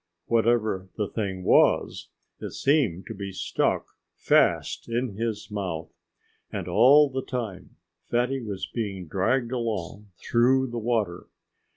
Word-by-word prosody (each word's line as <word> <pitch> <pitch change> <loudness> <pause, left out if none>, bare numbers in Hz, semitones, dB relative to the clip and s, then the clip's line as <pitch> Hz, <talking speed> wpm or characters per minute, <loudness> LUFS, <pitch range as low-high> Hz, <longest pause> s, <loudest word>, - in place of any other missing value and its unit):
Whatever 110 -5 +1
the 105 -2 -1
thing 95 -4 -4
was, - - +3 0.3
it - - -6
seemed 130 - +1
to - - -6
be 100 -1 -6
stuck 95 - 0 0.3
fast - - +2
in 120 +2 -1
his 110 0 -4
mouth. 90 -6 -4 0.6
And - - -4
all 145 +4 +6
the 130 -1 -3
time 110 -9 -6 0.3
Fatty 125 +3 0
was 100 -5 -4
being 100 -6 -4
dragged 115 +8 0
along 105 -5 -3
through 130 +4 +2
the 120 - -3
water. 110 -6 -1
115 Hz, 130 wpm, -26 LUFS, 95-120 Hz, 0.6 s, all